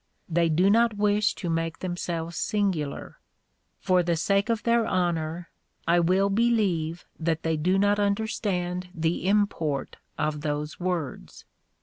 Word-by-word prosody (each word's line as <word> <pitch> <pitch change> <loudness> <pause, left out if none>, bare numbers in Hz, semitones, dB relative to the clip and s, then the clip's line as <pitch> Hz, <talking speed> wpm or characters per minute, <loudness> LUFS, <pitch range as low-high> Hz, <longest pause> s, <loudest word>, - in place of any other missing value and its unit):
They 170 0 +2
do 170 +5 +3
not 230 -1 +3
wish 210 +1 +2
to 180 - -5
make 165 0 -1
themselves 170 -2 -4
singular. 190 -10 -2 0.6
For 185 -1 +3
the 170 -1 0
sake 200 +6 +1
of 230 -1 0
their 235 -1 +2
honor, 170 -2 -1 0.4
I 170 +1 +4
will 185 +4 +2
believe 195 -7 +1
that 160 -1 -1
they 160 -1 +1
do 180 +5 +1
not 205 +1 +3
understand 200 -4 -1
the 165 +2 -1
import 195 -8 0 0.2
of 150 -1 -1
those 150 +1 -3
words. 175 -7 -4
180 Hz, 135 wpm, -26 LUFS, 165-205 Hz, 0.6 s, I